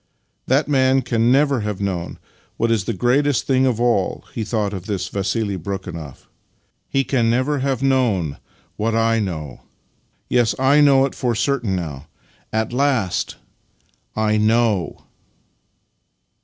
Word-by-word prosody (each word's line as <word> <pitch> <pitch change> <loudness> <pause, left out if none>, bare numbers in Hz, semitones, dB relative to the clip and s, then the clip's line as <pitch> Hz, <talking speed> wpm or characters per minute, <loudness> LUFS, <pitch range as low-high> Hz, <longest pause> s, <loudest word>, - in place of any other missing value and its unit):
" - - -48
That 140 +3 +2
man 135 -2 +3
can 115 0 +1
never 140 -1 +3
have 105 -2 -3
known 95 -4 -3 0.4
what 115 0 +1
is 110 -5 +1
the - - -1
greatest 130 +6 +1
thing 130 -1 +2
of 120 -3 0
all," 120 -6 0
he 115 - -3
thought 105 -2 -1
of 95 0 -7
this 100 -4 -2
Vassili 100 0 -2
Brekhunoff. 85 -6 -7 0.3
" - - -43 0.2
He 135 - +1
can 120 -4 +1
never 130 +5 +1
have 135 -1 -1
known 115 - +1 0.4
what 110 +1 0
I 115 0 +2
know. 80 - -5 0.7
Yes, 120 -2 +2
I 135 +3 +4
know 135 -2 +5
it 135 - -4
for 120 -3 -1
certain 120 -4 0
now. 75 -5 -5 0.4
At 110 +1 -1
last— 125 -8 0 0.8
I 110 0 +1
KNOW! 110 -3 +1
115 Hz, 145 wpm, -20 LUFS, 100-130 Hz, 0.8 s, know